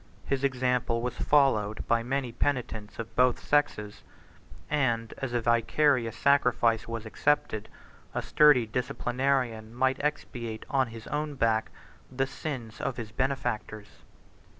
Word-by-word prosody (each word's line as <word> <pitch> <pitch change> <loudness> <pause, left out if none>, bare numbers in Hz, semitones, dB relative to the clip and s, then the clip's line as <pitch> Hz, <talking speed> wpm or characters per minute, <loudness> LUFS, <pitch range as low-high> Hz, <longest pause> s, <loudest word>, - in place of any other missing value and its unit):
His 140 -1 -1
example 125 -3 +1
was 125 - -2
followed 110 -8 +2
by 115 0 +3
many 130 +1 -2
penitents 115 -4 -2
of 115 -1 -7
both 125 -1 +4
sexes; 105 -8 0 0.7
and, 120 -6 0
as 135 -2 -3
a 120 -1 0
vicarious 120 +1 +2
sacrifice 125 -5 +3
was 115 -1 -5
accepted, 125 -3 0 0.5
a - - -1
sturdy 145 -6 +5
disciplinarian 120 -1 -1
might 130 +2 +1
expiate 120 -6 -3
on 135 -2 +2
his 115 -1 -10
own 150 0 -3
back 110 -3 +1 0.4
the 135 +1 0
sins 130 -5 -6
of 125 - -2
his 110 -3 -6
benefactors. 110 -4 -3
125 Hz, 125 wpm, -28 LUFS, 115-135 Hz, 0.7 s, sturdy